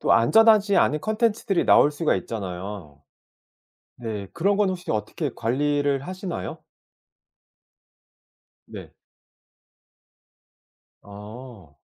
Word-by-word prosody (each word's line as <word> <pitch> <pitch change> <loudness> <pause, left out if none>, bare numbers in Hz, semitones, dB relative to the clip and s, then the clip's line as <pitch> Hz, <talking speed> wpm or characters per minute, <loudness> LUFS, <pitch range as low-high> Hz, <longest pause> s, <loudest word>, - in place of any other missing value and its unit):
또 - - +2
안전하지 215 - +5
않은 150 - +2
콘텐츠들이 215 -3 0
나올 145 - +5
수가 150 - 0
있잖아요. 95 -6 -7 1.0
네 110 -4 -6
그런 195 +4 +1
건 205 -2 +2
혹시 180 -1 -5
어떻게 110 +8 -3
관리를 145 +3 0
하시나요? 185 +3 -6 2.1
네. - - -10 2.1
아. 105 - -12
140 Hz, 190 characters per minute, -24 LUFS, -, 2.1 s, 안전하지